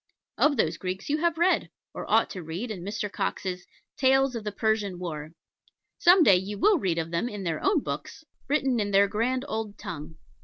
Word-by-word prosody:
Of 295 -2 +4
those 165 -5 +1
Greeks 185 - -5
you 300 +2 +1
have 340 0 +1
read, 350 +3 +2 0.2
or - - -7
ought - - +3
to 185 - -6
read, 175 +9 -5
in 190 -5 -6
Mr. 210 +3 -3
Cox's 190 -2 -3 0.3
Tales 270 -1 +3
of 230 - -4
the 210 - -3
Persian 210 -3 0
War. 155 -3 -6 0.7
Some 355 0 +7
day 195 -10 +6
you 200 +3 -4
will 405 - +4
read 180 -7 0
of 165 0 -2
them 170 +8 -1
in 205 -3 -6
their 165 -3 -2
own 385 -6 +3
books, - - -6 0.2
written 270 -3 +1
in 205 -1 0
their 200 0 +5
grand 245 +6 -1
old 220 -5 -4
tongue. 160 0 -7
210 Hz, 200 wpm, -27 LUFS, 180-265 Hz, 0.7 s, Some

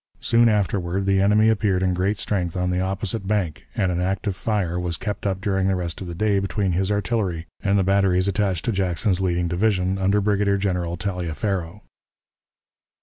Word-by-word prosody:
Soon 115 0 +4
afterward 95 -3 0
the 95 0 +3
enemy 105 +2 +4
appeared 100 -4 +2
in 90 -1 +2
great 95 +4 0
strength 90 -5 -1
on 90 0 0
the 90 - 0
opposite 95 +2 -2
bank, 95 -7 -1
and 95 - +1
an 90 0 -1
active 95 +1 -1
fire 95 -4 -1
was 90 -1 -2
kept 105 -3 -3
up 95 -1 -1
during 95 -2 0
the 95 - +2
rest 85 -1 -4
of 95 - -5
the 85 - -6
day 100 +1 +2
between 100 0 -1
his 95 +3 0
artillery 100 -5 -1 0.2
and 100 0 +2
the 95 - +3
batteries 95 -1 +2
attached 100 -3 0
to 115 - +1
Jackson's 95 0 0
leading 90 -2 0
division, 95 +1 0
under 100 +2 +2
Brigadier 100 -1 +1
General 90 -3 -1
Taliaferro. 90 0 -3
95 Hz, 185 wpm, -23 LUFS, 90-100 Hz, 0.2 s, Soon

